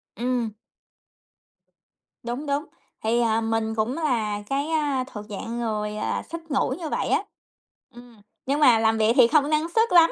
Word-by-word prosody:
Ừm. 240 -3 -1 1.7
Đúng, 245 +5 -4
đúng. 285 +2 -1 0.4
Thì, 235 +2 +2
à, 225 -1 +2
mình 225 0 -1
cũng 220 +4 0
là 220 -9 -1
cái, 280 +2 0
a, 290 -5 0
thuộc 210 -4 -8
dạng 230 +4 -5
người, 210 -2 -2
à, - - -2
thích 335 0 -6
ngủ 270 - +1
như 320 -3 -4
vậy - - -1
á. - - +2 0.7
Ừm, 240 -3 -15 0.2
nhưng 280 +3 0
mà 245 -6 +6
làm 220 0 +2
việc 220 +1 +3
thì 245 -4 +7
không 295 +1 +3
năng 310 +2 +1
suất 450 +4 +2
lắm. 335 -2 +7
240 Hz, 170 wpm, -24 LUFS, 220-295 Hz, 1.7 s, thì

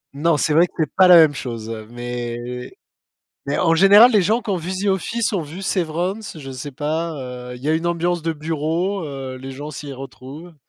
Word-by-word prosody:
Non, 155 +2 +2
c'est 150 - +1
vrai 170 +3 +5
que - - -32
c'est 155 -3 0
pas 185 -1 +6
la 180 - +9
même 160 -3 +7
chose, 115 -5 -6
heu, 110 -1 -7
mais 120 0 -5 0.7
mais 140 - -2
en 165 -2 +3
général 200 +7 +8
les 210 -4 +4
gens 220 +6 +2
qui - - -12
ont 195 - +1
vu 180 +2 -4
The 190 +2 -3
Office, 215 +4 0
ont 185 - 0
vu 155 +5 -9
Severance, 185 +1 -2
je 135 -2 -8
sais 130 +2 -6
pas, 160 +4 -2 0.4
heu, - - -7
il 125 - -14
y 145 - -2
a 155 - +3
une 165 +2 -1
ambiance 170 0 0
de 165 0 -1
bureau, 165 +5 -2
heu, 135 -3 -6
les 130 +1 -8
gens 145 +3 -7
s'y 145 -1 -7
retrouvent. 135 +5 -10
160 Hz, 225 wpm, -21 LUFS, 135-180 Hz, 0.7 s, la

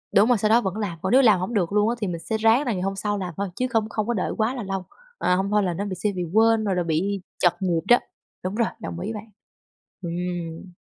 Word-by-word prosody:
đúng 205 +4 +6
rồi, 245 - +5
sau 210 +1 +1
đó 235 +2 +5
vẫn 190 0 -3
làm, 175 -6 -3
còn 190 - -1
nếu 265 +2 +7
làm 215 -7 +5
hổng 190 +6 -3
được 185 -4 +1
luôn 210 +2 +3
á, 240 - 0
thì 205 - 0
mình 170 -2 -3
sẽ 220 +6 -2
ráng 225 +6 +4
là 240 - 0
ngày 185 - -3
hôm 195 +1 -1
sau 205 +1 -1
làm 180 -3 -4
thôi 200 -1 -2
chứ 255 - 0
không 220 -2 0
không 215 -2 -2
có 240 - +1
đợi 195 - -1
quá 225 +4 +1
là 240 - -4
lâu, 190 -1 -4 0.3
ờ, 180 - +2
hông 195 +1 0
thôi 210 -1 +3
là 180 - 0
nó 200 +5 -3
bị 190 - -4
sẽ 205 +3 -1
bị 180 - -2
quên 225 0 +4
rồi 195 -3 0
là 175 - +1
bị 180 +5 -1 0.2
trật 175 - +4
nhịp 175 -3 +1
đó. 240 - +7 0.5
Đúng 185 +3 -3
rồi, 230 -1 +2
đồng 170 - -5
ý 210 +5 -3
bạn. 215 +1 -7 0.8
Ừm. 175 0 -4
200 Hz, 285 wpm, -24 LUFS, 180-220 Hz, 0.8 s, nếu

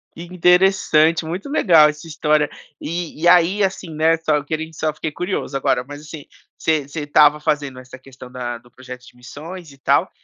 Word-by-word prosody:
Interessante, 175 -2 +2
muito 180 - -5
legal 165 - +5
essa 150 +2 -8
história. 150 -1 +1 0.3
E 170 -1 -5
e 170 - +2
aí, 180 +3 +4
assim, 190 -2 -3
né, 160 +2 +2
só 160 -2 0
eu 145 - -5
queren 160 +1 -4
só 155 0 -2
fiquei 155 +1 -5
curioso 180 -3 -4
agora, 125 -2 0
mas 145 +2 -10
assim, 150 -1 -10 0.3
você 155 -3 0
você 150 +2 -6
estava 150 0 +4
fazendo 145 -4 -2
essa 130 0 -13
questão 130 -1 -14
da 120 -1 -5
do 120 +1 -22
projeto 125 0 -11
de - - -18
missões 155 +7 -10
e 140 - -17
tal, 135 - +1
155 Hz, 190 wpm, -20 LUFS, 140-170 Hz, 0.3 s, legal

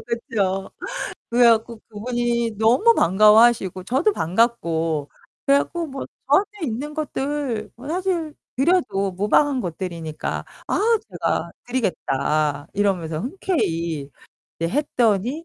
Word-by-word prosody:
그쵸. 200 -5 -2 0.6
그래 240 +1 +4
갖고 225 0 +1
그분이 235 +1 -1
너무 255 - +5
반가워하시고 210 -1 +4
저도 280 - +2
반갑고 165 - 0 0.4
그래 280 0 +6
갖고 340 +2 -3
뭐 270 -1 -6 0.2
저한테 385 +9 +4 0.2
있는 275 +6 -4
것들 285 -6 -3
뭐 270 +4 -10
사실 340 -3 -1 0.2
드려도 260 - +1
무방한 255 +8 +2
것들이니까 170 -3 -4 0.2
"아 - - +1 0.3
제가 - - -1 0.2
드리겠다." 150 - 0
이러면서 175 -6 0
흔쾌히 170 - -2 0.5
이제 165 0 0
했더니 250 - +1
230 Hz, 260 characters per minute, -22 LUFS, 185-275 Hz, 0.6 s, 그래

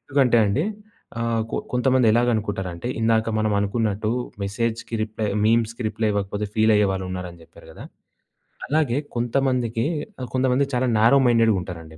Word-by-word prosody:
ఎందుకంటే 130 -4 +2
అండి 125 +10 0 0.6
ఆహ్, 115 -1 0
కొ - - -2
కొంతమంది 125 -1 +2
ఎలాగనుకుంటారంటే, 105 -5 -1
ఇందాక 115 0 +2
మనం 110 -1 +1
అనుకున్నట్టు 105 +1 -1 0.3
మెసేజ్‌కి 115 +3 -3
రిప్లై 110 0 -3 0.2
మీమ్స్‌కి 115 +2 +1
రిప్లై 110 +1 -1
ఇవ్వకపోతే 100 +1 -2
ఫీలయ్యేవాళ్ళున్నారని 95 -5 0
జెప్పారు - - -17
గదా! - - -11 0.8
అలాగే 145 -4 +1 0.2
కొంతమందికి 120 -1 0 0.4
ఆహ్, 125 - -4
కొంతమంది 130 +1 +2
చాలా 125 +1 +1
నారో 115 +5 +5
మైండెడ్‌గుంటారండి. 90 -9 0
115 Hz, 120 wpm, -23 LUFS, 100-120 Hz, 0.8 s, నారో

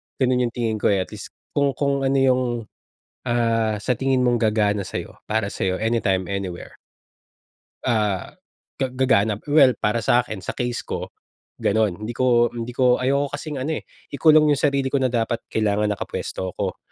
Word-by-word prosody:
Ganun 125 -2 +2
yung 120 - -9
tingin 110 -3 -1
ko - - +2
eh. 95 -2 +2
At - - -16
least - - -10 0.2
kung 140 -1 +1
kung 140 -1 0
ano 135 - +1
yung, 130 -1 +3 0.8
ah, 115 -3 +1
sa 125 +1 0
tingin 135 -1 +1
mong 120 -1 +3
gagana 105 -3 +1
sa'yo, - - -6
para 105 -2 -1
sa'yo, 95 0 -2
anytime, 100 -5 0
anywhere. 95 -3 -5 1.1
Ah, 105 -6 0 0.5
ga 130 -2 -2
gagana, 110 -5 +2
well, 140 -4 +6
para 105 +1 0
sa 120 - +4
akin, 120 - -7
sa 95 - -5
case 120 -1 -3
ko, - - -4 0.5
ganun. 105 -3 +1
Hindi 120 - -4
ko 120 -1 +3
hindi 120 0 -5
ko 125 -1 +3
ayoko 140 +2 +1
kasing 145 0 -5
ano 150 +5 -2
eh, - - -33 0.3
ikulong 155 0 +5
yung 140 - -2
sarili 140 -3 +1
ko 135 0 0
na 130 - +2
dapat 115 -1 -1
kailangan 105 -1 +1
nakapuwesto 95 -2 -4
ako. - - -3
120 Hz, 175 wpm, -22 LUFS, 105-130 Hz, 1.1 s, well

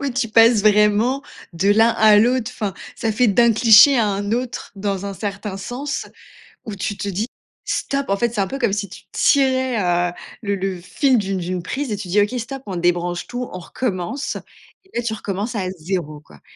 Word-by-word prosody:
Ouais, 280 -2 -2
tu 240 -2 -1
passes 225 0 +5
vraiment 210 +5 +3 0.3
de 185 +4 +1
l'un 225 +3 +5
à 220 -2 +5
l'autre, 245 +2 +2
enfin, 205 -4 -3 0.2
ça 225 - -1
fait 245 +4 +3
d'un 235 +3 +4
cliché 230 +4 +7
à 225 - +3
un 200 +1 -2
autre 245 +1 -3
dans 195 -1 -3
un 200 - -5
certain 200 0 -5
sens 250 +9 -4 0.6
où 215 - -6
tu 195 +2 -3
te 200 - -4
dis: 200 +3 -2 0.4
«Stop!», 275 0 -1
en 200 - +2
fait, 235 +3 0
c'est 210 - -1
un 195 - +1
peu 275 - -5
comme 235 -6 +1
si 200 0 -2
tu 185 - -12
tirais, 260 -3 +2 0.3
heu, - - -11 0.3
le 200 -2 -1
le 190 -1 -3
fil 195 - +1
d'une 195 -2 -2
d'une 180 0 -3
prise 265 +8 -4
et - - -1
tu 200 -2 -7
dis: 200 +4 +3
«OK, 210 +5 0
stop, 265 +3 -6
on 190 -3 -5
débranche 175 0 0
tout, 245 0 -5
on 185 - -6
recommence!» 190 - -3 0.5
et 380 - -27
là - - 0
tu 230 -2 -2
recommences 205 +2 -4
à 190 -3 -2
0, 155 -3 -4
quoi! 75 - -19
210 Hz, 210 wpm, -20 LUFS, 195-240 Hz, 0.6 s, cliché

